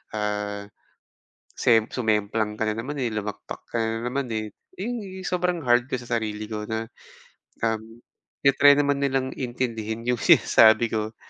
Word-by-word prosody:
ah, 105 -1 -3 0.9
sem 115 -3 +3
sumemplang 110 -2 0
ka 110 - 0
na 110 - 0
naman, 140 +6 -4
eh, 125 -3 -1
lumagpak 105 -1 -5
ka - - -3
na 115 0 -1
naman, 135 +2 -2
eh." 110 -1 -3 0.3
'Yung 235 +5 -3
yu 190 -1 -8
sobrang 180 -1 0
hard 120 -2 +3
ko - - 0
sa 120 -1 -1
sarili 105 -1 -4
ko 105 -1 -4
na, 110 0 -2 0.8
um, 110 -1 0 0.6
i-try 140 +1 +6
naman 145 -1 +2
nilang 135 -1 0
intindihin 115 -3 -3
'yung 125 -1 +1
sinasabi 110 +1 +5
ko. 110 0 -2
115 Hz, 155 wpm, -25 LUFS, 110-135 Hz, 0.9 s, i-try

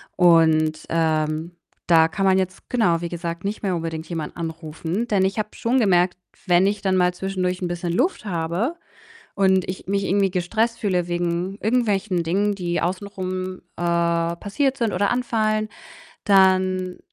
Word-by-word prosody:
Und, 160 -3 +4
ähm, 160 0 0 0.4
da 160 -1 +6
kann 195 +4 -2
man 190 0 +4
jetzt, 185 0 -4
genau, 175 -9 +2
wie 170 - -3
gesagt, 170 0 -5
nicht 205 +2 -3
mehr 190 -3 0
unbedingt 165 -1 -4
jemanden 165 -3 -5
anrufen. 165 +5 -4
Denn 200 -4 +2
ich 195 +2 -1
habe 215 0 -1
schon 240 +3 0
gemerkt, 180 -5 +3 0.3
wenn 175 +1 +4
ich 200 0 0
dann 190 -1 +1
mal 180 -1 +3
zwischendurch 185 -1 -2
'n 180 - -1
bisschen 175 0 -3
Luft 330 - 0
habe 180 - -1 0.6
und 190 -2 +3
ich 185 0 -6
mich 195 0 0
irgendwie 195 0 +2
gestresst 220 +6 0
fühle 180 -4 0
wegen 175 +2 -2
irgendwelchen 210 -5 +1
Dingen, 200 +5 +1
die 175 -2 -2
außen 185 +4 -2
rum, 185 -1 -5
äh, - - -8 0.6
passiert 270 +8 -1
sind 230 -3 0
oder 200 +3 +1
anfallen, 215 -3 0 0.6
dann 185 -2 +3
185 Hz, 160 wpm, -22 LUFS, 170-200 Hz, 0.6 s, da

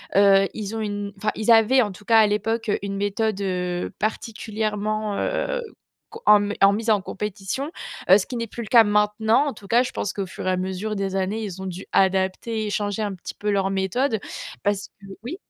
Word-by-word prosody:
heu, 195 -1 +6
ils 215 0 -5
ont - - -3
une 205 -1 -3
enfin 215 - -1
ils 220 +2 +2
avaient 230 +4 +6
en 205 - -1
tout 195 +2 -14
cas 225 +1 +5
à 215 - +6
l'époque 225 +1 -1
une 200 0 -4
méthode, 205 +1 -1
heu, 180 -2 -2
particulièrement, 215 -1 -2
heu, - - -1 0.5
co 450 +1 -11
en 210 -1 +7
m 205 - -2
en 195 0 +7
mise 225 +2 -2
en 210 -3 +4
compétition, 210 - -4 0.4
heu, 190 - +9
ce 195 - -2
qui 245 - -5
n'est 230 - -3
plus 235 - -7
le - - -9
cas 230 -3 +7
maintenant. 210 +5 +2
En 280 - -2
tout 200 -2 -14
cas, 240 +4 +4
je - - -5
pense 195 - -3
qu'au 200 - -3
fur 185 - -7
et 185 - +3
à - - +2
mesure 190 +3 -3
des 195 -1 -2
années, 205 +4 -1
ils 190 -2 -6
ont - - -5
dû 185 +1 -6
adapter 190 +4 +1
et - - -2
échanger 205 +1 -2
un 205 -2 -2
petit 175 - -8
peu 210 0 -2
leur 195 -1 +1
méthode 195 +4 0 0.4
parce 200 -1 0
que 195 - -12 0.2
oui? 285 +9 -5
210 Hz, 225 wpm, -23 LUFS, 195-220 Hz, 0.5 s, heu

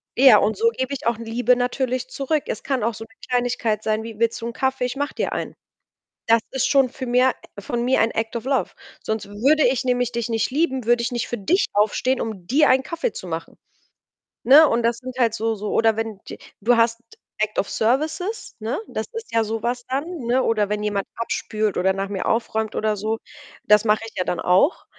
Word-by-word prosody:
ja, 260 -4 +8
und 210 +2 +1
so 460 +1 +3
gebe 265 - -3
ich 265 - -4
auch 235 -2 +1
Liebe 235 +2 +1
natürlich 250 0 -1
zurück. 285 +2 -1
Es - - -4
kann 265 -5 -1
auch 230 +1 0
so 225 +1 -8
'ne 225 - -23 0.2
Kleinigkeit 245 -3 0
sein 215 0 0
wie: 225 -2 -9
„Willst 230 0 0
du 230 - -4
'n 235 - -5
Kaffee? 265 0 -1
Ich 250 +2 -4
mache 285 +1 -2
dir - - -1
einen.“ - - -4 0.7
Das 230 0 +5
ist 265 - 0
schon 270 -3 +3
für 260 -2 -6
mir 250 +1 +3 0.3
von 235 +4 -3
mir 260 +1 +2
ein 225 - +3
Act 225 +1 -3
of 235 - -4
Love. 270 0 0 0.3
Sonst 220 -2 -3
würde 275 +9 +3
ich 255 +1 +1
nämlich 245 -1 0
dich 235 0 -2
nicht 225 -2 0
lieben, 265 -4 0
würde 240 +1 +3
ich 235 - -1
nicht 240 0 -2
für 240 - -3
dich 355 - +2
aufstehen, 220 +5 +1
um 205 -6 -5
dir 290 - +4
einen 260 +1 +4
Kaffee 335 - -3
zu - - -8
machen. - - -6 0.9
Ne? 290 +5 +8
Und 235 0 +1
das 230 0 +1
sind 255 0 -8
halt 235 -3 +2
so 225 0 -1
so 210 0 -5
oder 225 -1 +3
wenn 225 -3 -4
d - - -7 0.2
du 240 +4 +4
hast 230 0 +2 0.4
Act 215 0 -1
of 200 - -1
Services, 310 - -1
ne? 225 - -3
Das - - -4
ist 455 0 -7
ja 225 -1 +3
so 220 0 -4
was 245 0 -2
dann, 270 +3 -2 0.2
ne? 250 +2 +2
Oder 215 -2 +1
wenn 210 0 -2
jemand 205 -2 -1
abspült 215 -2 -2
oder 190 +1 +2
nach 195 +1 -3
mir 195 -2 -3
aufräumt 220 -1 -1
oder 215 -1 0
so, 215 +2 -2 0.5
das 210 +1 +4
mache 215 0 +3
ich 225 - -12
ja 185 - 0
dann 180 - -2
auch. 185 - +2
235 Hz, 225 wpm, -22 LUFS, 220-260 Hz, 0.9 s, ja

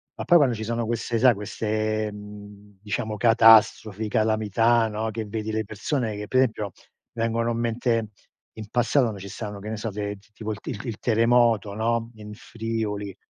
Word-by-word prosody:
ma - - -5
poi 175 - +6
quando 130 -6 +3
ci 110 - -5
sono 115 +1 -2
queste 115 0 -2
sai 125 -1 +6
queste, 110 +1 -2
mhmm, 105 -1 -12
diciamo 105 +1 -3
catastrofi, 110 -1 +5
calamità, 110 +1 +2
no, 110 +1 -3
che 110 0 -4
vedi 110 +1 -4
le 110 0 -1
persone 110 +1 -2
che 105 0 -6
pe 130 - 0
esempio, 110 -6 +1 0.4
vengono 115 0 0
in 115 - -2
mente 115 -1 0 0.4
in 110 -1 -9
passato, 120 0 +2
no, 100 - -8
ci 100 +1 -8
stavano, 105 0 -6
che 105 +2 -7
ne 110 - -4
so, 110 +1 -3
de 100 0 -4 0.2
tipo 110 0 -5
il 105 - -5 0.3
il 115 -3 -4
terremoto, 115 -2 +3
no, 115 +1 -1
in 105 -1 -10
Friuli. 110 -3 -4
110 Hz, 175 wpm, -25 LUFS, 105-115 Hz, 0.4 s, poi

